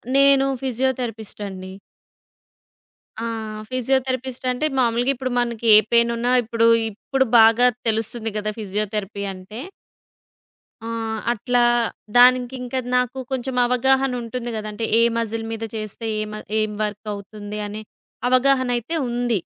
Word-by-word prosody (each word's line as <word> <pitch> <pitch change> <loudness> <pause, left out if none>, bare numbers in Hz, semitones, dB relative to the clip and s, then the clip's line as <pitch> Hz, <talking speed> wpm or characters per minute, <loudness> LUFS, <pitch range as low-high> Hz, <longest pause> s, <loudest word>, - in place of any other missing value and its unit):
నేను 275 -1 +5 0.2
ఫిజియోథెరపిస్ట్ 250 -4 -2
అండి. 190 -1 -8 1.5
ఆ! - - -2 0.5
ఫిజియోథెరపిస్ట్ 260 0 -1
అంటే, 250 +5 -1
మామూలుగా 240 +1 +2
ఇప్పుడు 255 0 -3
మనకి 235 -1 -2
ఏ - - +10
పేయినున్నా 235 +1 +2
ఇప్పుడు 230 0 +1 0.3
ఇప్పుడు 265 +6 -1
బాగా 225 +2 +6 0.2
తెలుస్తుంది 225 +1 -2
గదా! 215 0 -2
ఫిజియోథెరపీ 205 0 -3
అంటే. 190 +5 -10 1.2
ఆ! 225 - -6 0.5
అట్లా 245 +2 0 0.6
దానికింకా 250 +1 +4 0.2
నాకు 250 +1 0
కొంచెం 260 0 -2
అవగాహన 265 +2 +2
ఉంటుంది 240 +1 -5
గదా! 215 0 -5
అంటే 225 +2 -3
ఏ - - +5 0.2
మసిల్ 225 0 -2
మీద 225 0 -5
చేస్తే, 215 +1 -6
ఏ - - -1
మ - - -5 0.2
ఏం 215 0 0
వర్క్ 210 +1 -5
అవుతుంది 205 +1 -7
అనే 210 +1 -6 0.5
అవగాహనైతే 255 +1 +2
ఉంది. 240 -3 0
235 Hz, 120 wpm, -22 LUFS, 215-255 Hz, 1.5 s, ఏ